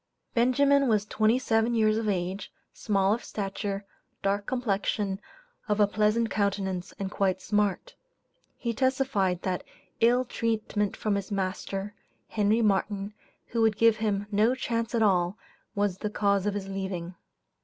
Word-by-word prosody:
Benjamin 275 +3 +4
was 210 -3 +2
twenty 220 +3 +2
seven 230 -2 +1
years 215 -1 +3
of 220 -2 -1
age, 185 +1 -2 0.2
small 200 -2 +1
of 235 - -3
stature, 200 0 -4 0.4
dark 200 +1 0
complexion, 205 -5 -1 0.5
of 210 0 +1
a 205 - +7
pleasant 215 +2 +1
countenance, 195 -2 -1
and 195 -1 -4
quite 190 -1 +1
smart. 210 - 0 0.6
He 235 -1 -2
testified, 255 -8 +1
that 185 -1 -1 0.4
"ill 245 +2 +4
treatment 220 -3 -1
from 215 - 0
his 200 +1 -3
master," 195 +1 -3 0.4
Henry 215 +2 +2
Martin, 200 0 0 0.4
who 230 - 0
would 220 -2 +3
give 230 -1 +5
him 205 -2 0
"no 215 +5 +3
chance 230 -2 -2
at 225 - +3
all," 185 -1 +2 0.4
was 200 -2 0
the 210 - -2
cause 200 -1 +1
of 205 - 0
his 195 -1 -4
leaving. 190 -2 -4
205 Hz, 145 wpm, -28 LUFS, 195-225 Hz, 0.6 s, a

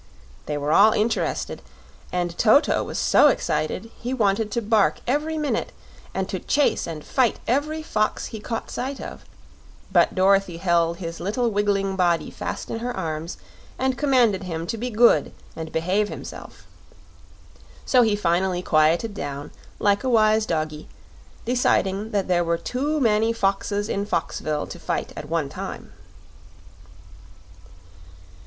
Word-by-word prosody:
They 150 - -2
were 145 +1 -1
all 210 +6 +6
interested, 225 +1 -1 0.5
and 175 -1 -2
Toto 235 - +4
was - - -5
so - - +5
excited 225 - -1
he 250 +2 -3
wanted 210 -2 +1
to 235 - -1
bark 220 -2 +2
every 300 +5 0
minute 300 -2 -2 0.4
and - - -2
to - - -3
chase 290 -1 +1
and 155 -2 -7
fight 255 -4 +1
every 305 +5 0
fox 215 -8 -1
he 220 - -5
caught 225 +1 -5
sight 270 +2 -4
of; - - -8 0.7
but - - +3
Dorothy 195 -2 +3
held 170 -1 +1
his 170 -2 -6
little 230 +5 0
wiggling 200 -1 0
body 175 -3 +1
fast - - -5
in 225 - -3
her 245 -1 -4
arms 160 -1 -4 0.4
and 260 0 0
commanded 245 -8 +3
him 165 -2 -4
to 200 - -3
be 240 +3 -3
good 220 - +4 0.2
and 160 -1 -6
behave 190 +6 0
himself. - - -9 1.2
So 255 - +5
he 220 -3 +3
finally 180 -1 0
quieted 165 +8 +2
down, 145 -5 -6 0.3
like 200 0 +2
a 260 - 0
wise 215 -2 +3
doggy, 155 -2 -3 0.6
deciding 215 -4 +1
there 185 -4 +1
were 170 0 0
too 280 - -2
many 225 -2 +2
foxes 200 0 0
in 200 -1 -2
Foxville 150 -6 -2
to - - -9
fight - - -3
at 150 - -8
one 165 -3 0
time. - - -7
205 Hz, 145 wpm, -23 LUFS, 170-230 Hz, 1.2 s, all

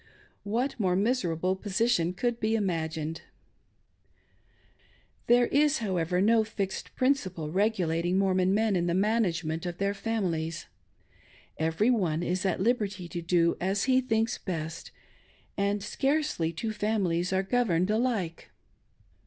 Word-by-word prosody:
What 240 +6 -2
more 185 -4 +2
miserable 185 -5 0
position 195 -2 +1
could 240 +3 -1
be 220 +1 +1
imagined? 165 -5 -2 2.1
There 240 +1 +5
is, 295 +3 +3
however, 180 -5 -1
no 220 +3 +4
fixed 200 -3 -5
principle 185 - 0
regulating 180 -3 +1
Mormon 185 -1 +2
men 215 0 +2
in 175 -1 0
the 170 - +1
management 180 -6 0
of 175 0 -5
their 200 0 0
families 175 -7 -2 0.5
— - - -29
every 210 +9 +2
one 175 -8 0
is 180 +2 -1
at - - -1
lib 240 +6 +2
erty 195 -4 -4
to 175 - -4
do 170 0 +2
as 195 +2 0
he 260 0 +3
thinks 225 -2 0
best, 160 -4 -5 0.7
and 200 0 0
scarcely 270 - 0
two 215 +7 -4
families 195 -5 0
are 190 0 +1
governed 195 -4 +1
alike. 215 -8 -1
195 Hz, 130 wpm, -28 LUFS, 175-225 Hz, 2.1 s, There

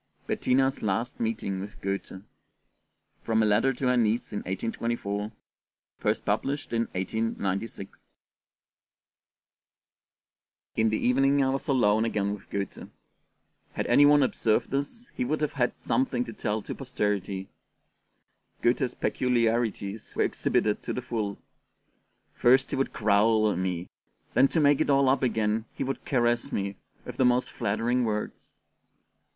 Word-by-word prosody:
BETTINA'S 135 +1 +1
LAST 110 +4 -2
MEETING 110 -4 -2
WITH 100 +2 -8
GOETHE 95 -1 -4 1.0
From 110 -1 +1
a - - +3
Letter 105 +5 +3
to 130 +1 -4
her 125 0 +3
Niece 115 0 +1
in 105 - -1
1824, 105 +1 -3 0.7
first - - 0
published 140 -2 -1
in 115 0 +1
1896 100 0 -3 2.6
IN 110 0 +3
THE 110 - 0
evening 135 +3 +3
I 130 - +2
was 135 - -3
alone 110 -5 +3
again 105 -3 0
with 105 - -10
Goethe. 100 -2 -5 0.8
Had - - -2
any 145 - +5
one 145 -1 +6
observed 115 -2 +1
us, 185 - -3
he - - -2
would 150 +5 -1
have 150 -1 -1
had 125 -3 -1
something 255 -1 0
to - - -8
tell 110 - -2
to - - -5
posterity. 105 -7 -2 1.2
Goethe's 125 +1 +1
peculiarities 115 -4 0
were - - +2
exhibited 105 -1 0
to - - -4
the 125 - -4
full: 105 -5 -3 1.0
first 130 +2 +4
he - - 0
would 135 - 0
growl 110 0 +3
at 90 - -2
me, 90 -1 -2 0.5
then 130 +3 +5
to 160 - 0
make 145 -2 +4
it - - +1
all 140 -1 +4
up 135 +1 +3
again 110 -3 0
he - - -2
would 135 0 -4
caress 120 -2 +1
me, 100 0 -2 0.3
with - - -8
the - - +3
most 125 0 +2
flattering 120 +3 0
words. 105 -2 -4
115 Hz, 140 wpm, -27 LUFS, 105-130 Hz, 2.6 s, one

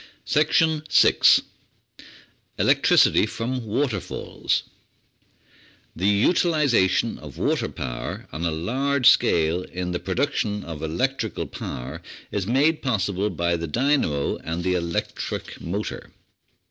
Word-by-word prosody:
6 155 +1 +4 1.2
Electricity - - +4
from 115 +2 -4
Waterfalls 110 -2 -2 1.3
The 95 +4 0
utilisation 120 - +2
of - - -11
water - - 0
power - - -6
on 80 - -4
a 85 - +1
large 125 - 0
scale 85 - +4
in 90 0 -5
the 85 - -2
pro 95 - -4
duction 110 -6 -1
of 80 -3 -7
electrical 110 +7 -2
power 60 - -7 0.3
is 100 -2 -2
made 145 +7 +2
possible 100 -5 0
by 85 -1 0
the 85 0 -4
dynamo 120 - 0
and 85 +2 -5
electric 90 -2 -3
motor. 100 +5 -5
105 Hz, 105 wpm, -24 LUFS, 85-135 Hz, 1.3 s, 6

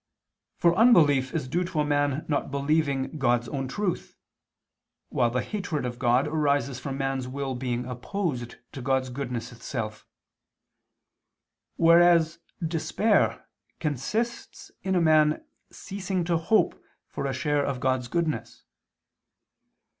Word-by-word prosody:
For 170 -1 +4
unbelief 150 - +5
is 150 -5 -2
due 175 +7 0
to 175 -3 -3
a - - 0
man 145 0 0
not 145 -2 -1
believing 140 0 0
God's 120 -2 +2
own 135 -2 -3
truth; 185 +6 -3 0.9
while 120 - +2
the 125 +2 -1
hatred 180 -10 -3
of 120 0 -5
God 125 +3 +3
arises 145 -4 0
from 135 +1 -5
man's 135 -2 -2
will 135 +1 -3
being 125 -1 -2
opposed 125 - -3 0.2
to 135 - -7
God's 130 0 0
goodness 125 -3 -4
itself; 115 -2 -6 1.7
whereas 170 -1 +5 0.3
despair 190 +6 +1 0.3
consists 210 - -3
in 190 -1 -1
a 175 - +3
man 155 -1 +3 0.2
ceasing 190 -2 -4
to 170 0 0
hope 215 +7 +1 0.2
for - - -4
a - - -1
share 145 +2 0
of 140 -2 -2
God's 130 -1 0
goodness. 165 +1 -2
145 Hz, 125 wpm, -26 LUFS, 130-170 Hz, 1.7 s, unbelief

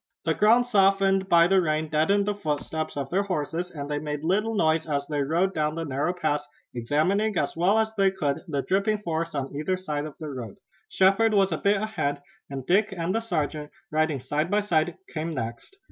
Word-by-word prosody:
The - - +2
ground 230 +4 +4
softened 195 -3 +3
by 170 -1 +6
the 190 +1 +4
rain 155 -1 0
deadened 160 +7 +2
the 210 - 0
footsteps 155 -4 -3
of 140 -1 -4
their 190 +3 +2
horses, 180 -2 -3
and 145 -4 -6
they 145 0 -2
made 150 0 -4
little 210 +6 +1
noise 160 -4 +2
as 140 -1 -1
they 145 -1 -2
rode 170 +7 +1
down 155 -1 -1
the 165 0 -3
narrow 145 +4 -1
pass, 150 -4 -2 0.3
examining 175 - 0
as 140 - -1
well 180 +6 +3
as 220 0 +1
they 195 -3 +3
could 150 -8 -2
the 140 -4 -2
dripping 200 +3 +1
forest 165 -2 -2
on 140 0 -3
either 170 +6 -1
side 150 -5 -3
of 155 - -8
the 155 - -5
road. 120 -7 -7 0.3
Shepard 195 +4 +3
was 195 -2 +3
a 160 - 0
bit 200 +1 +3
ahead, 215 -10 -2 0.3
and 135 -2 -6
Dick 200 +6 +2
and 175 -1 -2
the 225 - 0
sergeant, 155 -7 -2 0.2
riding 155 -2 +1
side 150 +6 -2
by 210 +1 +2
side, 175 -3 0 0.2
came 160 0 -3
next. 120 - -6
165 Hz, 205 wpm, -26 LUFS, 150-195 Hz, 0.3 s, by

